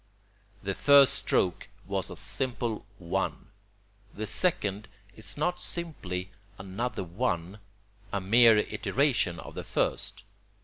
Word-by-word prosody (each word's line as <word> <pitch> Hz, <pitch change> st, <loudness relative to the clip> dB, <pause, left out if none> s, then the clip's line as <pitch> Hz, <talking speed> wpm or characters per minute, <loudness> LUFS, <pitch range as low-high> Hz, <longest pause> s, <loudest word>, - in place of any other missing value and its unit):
The 100 Hz, 0 st, -1 dB
first 140 Hz, +4 st, +6 dB
stroke 90 Hz, -9 st, 0 dB, 0.2 s
was -, -, -2 dB
a -, -, -7 dB
simple 120 Hz, -4 st, -2 dB
1. 95 Hz, +2 st, -2 dB, 0.7 s
The 110 Hz, -, -3 dB
second 105 Hz, -, +1 dB, 0.3 s
is 110 Hz, -, -2 dB
not 175 Hz, +4 st, 0 dB
simply 95 Hz, -, -3 dB, 0.3 s
another 95 Hz, +4 st, -3 dB
1, 90 Hz, 0 st, -2 dB, 0.5 s
a 100 Hz, -, 0 dB
mere 115 Hz, +4 st, +6 dB
iteration 105 Hz, -, +1 dB
of -, -, -9 dB
the -, -, -5 dB
first. 105 Hz, +1 st, -2 dB
105 Hz, 115 wpm, -29 LUFS, 95-130 Hz, 0.7 s, first